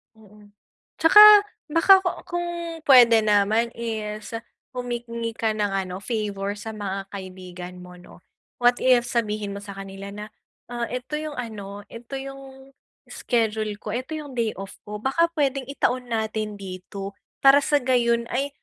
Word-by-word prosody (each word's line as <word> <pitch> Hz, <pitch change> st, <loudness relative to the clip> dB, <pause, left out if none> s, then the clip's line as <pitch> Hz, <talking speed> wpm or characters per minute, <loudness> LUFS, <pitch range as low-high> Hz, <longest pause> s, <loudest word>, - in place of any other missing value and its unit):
Mm. 210 Hz, -1 st, -19 dB, 0.4 s
'Tsaka 325 Hz, +6 st, +7 dB, 0.5 s
baka 330 Hz, +5 st, +6 dB
ku 375 Hz, -1 st, -1 dB
kung 350 Hz, 0 st, -3 dB, 0.4 s
pwede 240 Hz, -4 st, +8 dB
naman 215 Hz, +2 st, +2 dB
is 215 Hz, -2 st, -5 dB, 0.4 s
humingi 240 Hz, -2 st, -4 dB
ka 225 Hz, -1 st, 0 dB
ng 210 Hz, -2 st, -1 dB
ano, 185 Hz, -1 st, -3 dB
favor 205 Hz, -2 st, -3 dB
sa 210 Hz, +2 st, -7 dB
mga 195 Hz, -2 st, -5 dB
kaibigan 185 Hz, -2 st, -9 dB
mo 180 Hz, 0 st, -12 dB
'no. 180 Hz, -, -16 dB, 0.4 s
What 245 Hz, 0 st, +4 dB
if, 250 Hz, -2 st, +4 dB
sabihin 215 Hz, -3 st, -1 dB
mo 200 Hz, -, -5 dB
sa 200 Hz, -1 st, -9 dB
kanila 195 Hz, 0 st, -8 dB
na, 210 Hz, 0 st, -6 dB, 0.5 s
"Ah, 240 Hz, -1 st, -3 dB
ito 255 Hz, +5 st, -4 dB
yung 305 Hz, -1 st, -5 dB
ano, 205 Hz, -5 st, -7 dB
ito 235 Hz, +3 st, -9 dB
yung 270 Hz, 0 st, -9 dB, 0.4 s
schedule 220 Hz, -3 st, -1 dB
ko, 210 Hz, -, -5 dB
ito 255 Hz, +7 st, -4 dB
yung 295 Hz, -3 st, -8 dB
day 225 Hz, -2 st, 0 dB
off 195 Hz, 0 st, -7 dB
ko. 210 Hz, 0 st, -5 dB
Baka 270 Hz, +10 st, +1 dB
puwedeng 275 Hz, -3 st, 0 dB
itaon 255 Hz, -3 st, -1 dB
natin 220 Hz, -2 st, -2 dB
dito 195 Hz, +1 st, -7 dB, 0.3 s
para 275 Hz, +1 st, +7 dB
sa 290 Hz, +1 st, +1 dB
gayon 240 Hz, -3 st, +2 dB
ay 275 Hz, +3 st, 0 dB
225 Hz, 150 wpm, -24 LUFS, 200-255 Hz, 0.5 s, pwede